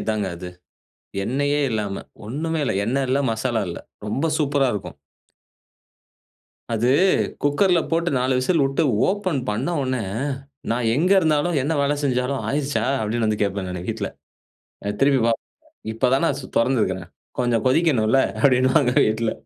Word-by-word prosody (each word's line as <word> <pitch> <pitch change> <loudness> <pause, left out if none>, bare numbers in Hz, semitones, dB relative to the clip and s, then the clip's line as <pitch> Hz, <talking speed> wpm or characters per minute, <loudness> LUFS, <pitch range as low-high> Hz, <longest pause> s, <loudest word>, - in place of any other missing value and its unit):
இதாங்க 110 -2 -1
அது. 90 +1 -7 0.8
எண்ணெயே 145 +4 0
இல்லாம, 105 -3 -2 0.2
ஒண்ணுமே 155 +7 -2
இல்ல, - - 0
எண்ணெ 135 +5 0
இல்ல, 135 +2 +2
மசாலா 115 0 -1
இல்ல. 85 - -5 0.3
ரொம்ப 135 +9 -1
சூப்பரா 145 -2 +2
இருக்கும். 105 - -6 1.7
அது, 115 +2 +1 0.5
குக்கர்ல 170 +5 +3
போட்டு 170 +1 +1
4 130 +1 +1
விசில் 145 +4 +2
விட்டு 135 +4 0 0.3
ஓப்பன் 185 -7 0
பண்ண 115 +10 -2
உடனே, 130 -2 -1 0.7
நான் 115 0 +1
எங்க 175 +7 +1
இருந்தாலும், 155 +1 +1
என்ன 155 +4 0
வேலை 145 +1 +1
செஞ்சாலும், 130 +1 0
"ஆயிருச்சா?" 145 0 -1 0.2
அப்டீன்னு 110 +1 0
வந்து 105 -1 -1
கேட்பேன் 100 -2 -1
நானு 90 0 -5
வீட்ல. 110 -3 -2 0.8
அ 100 - 0
திருப்பி 135 -1 +4
பாப்பாங்க. 115 -1 -2 0.4
"இப்போ 115 +3 0
தான் 135 +5 +2
நான் 140 -4 0
சு 130 - -8
தொறந்துருக்குறேன். 105 -8 0 0.3
கொஞ்சம் 120 -1 +1
கொதிக்கணும்ல்ல?" 135 -5 +3 0.2
அப்டீன்பாங்க 130 -1 +4
வீட்ல. 110 +1 0
130 Hz, 140 wpm, -22 LUFS, 110-145 Hz, 1.7 s, திருப்பி